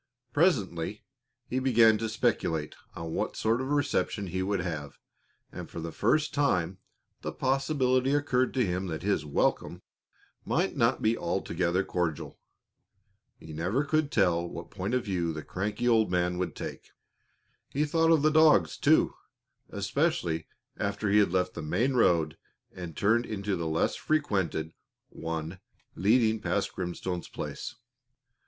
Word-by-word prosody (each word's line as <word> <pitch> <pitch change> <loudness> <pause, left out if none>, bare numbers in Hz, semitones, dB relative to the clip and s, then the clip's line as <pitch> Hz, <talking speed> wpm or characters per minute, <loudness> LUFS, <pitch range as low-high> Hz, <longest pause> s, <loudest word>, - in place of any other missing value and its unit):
Presently 105 - +1 0.4
he 130 - -1
began 115 -4 +5
to 115 - -2
speculate 105 -9 0 0.2
on 85 -1 -5
what - - -2
sort 115 +3 +1
of 130 - -3
reception 145 -7 0
he 95 0 -3
would 95 0 0
have, 80 -6 -5 0.5
and - - -8
for - - -7
the 85 0 -5
first 155 - +1
time 95 - +1 0.4
the - - -3
possibility 135 0 +1
occurred 130 -3 +1
to 125 -3 +3
him 90 +1 -2
that 80 -1 -4
his 95 -7 0
welcome 70 - 0 0.6
might - - 0
not - - +2
be 110 +1 +3
altogether 90 0 -1
cordial. 85 -5 -3 1.0
You 80 - -11
never 90 - 0
could 155 0 0
tell 85 -4 +2
what - - -8
point 100 +7 -2
of 125 - -1
view 85 -5 -1
the 75 -1 -6
cranky 105 +5 -2
old 110 -2 +4
man 90 0 0
would 90 - -2
take. - - -7 0.8
He 150 +2 0
thought 165 +2 +2
of 160 -3 +4
the 155 - +4
dogs, 150 - +5
too, - - +4 0.6
especially 80 -1 -1 0.3
after 105 -2 -1
he 105 - +6
had 100 -4 +3
left 90 0 0
the - - -6
main 110 - 0
road 85 - +2 0.3
and 85 -4 -8
turned 115 +4 +2
into 100 -2 -2
the 85 -2 -3
less 80 +1 +1
frequented 95 - -1 0.4
one 80 +2 -5 0.3
leading 110 +2 +3
past 100 -1 -1
Grimstone's 90 -1 -4
place. - - -6
100 Hz, 150 wpm, -29 LUFS, 85-125 Hz, 1.0 s, he